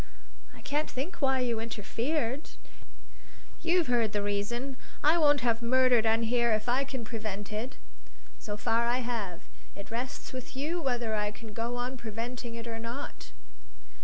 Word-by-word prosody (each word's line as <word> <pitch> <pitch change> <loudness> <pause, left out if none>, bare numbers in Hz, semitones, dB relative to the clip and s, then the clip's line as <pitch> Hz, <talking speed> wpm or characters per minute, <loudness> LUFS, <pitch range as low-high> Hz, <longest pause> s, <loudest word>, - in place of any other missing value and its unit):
"I - - -13
can't 295 +2 0
think 285 +8 -4
why 265 -2 +4
you 235 -3 +1
interfered." 230 +5 -1 1.1
"You've 345 0 +4
heard 235 -4 +2
the 205 -1 +1
reason. 235 +7 -1 0.3
I 315 +4 +6
won't 290 -3 +6
have 230 -1 +2
murder 250 0 +5
done 225 +1 +3
here 235 0 +3
if 215 +2 0
I 250 +3 +3
can 260 -4 -4
prevent 215 -3 -4
it; 225 +5 -3 0.6
so 205 -1 -4
far 230 +2 +2
I 245 +2 +2
have; 215 -8 -2 0.3
it 200 - -9
rests 245 +3 -4
with 255 0 -6
you 315 +6 -1
whether 245 -5 0
I 210 -1 +1
can 215 +1 -9
go 235 +3 -1
on 250 +2 -2
preventing 235 +1 -4
it 230 0 -5
or 225 -1 -4
not." 235 +5 -6
235 Hz, 160 wpm, -31 LUFS, 225-260 Hz, 1.1 s, I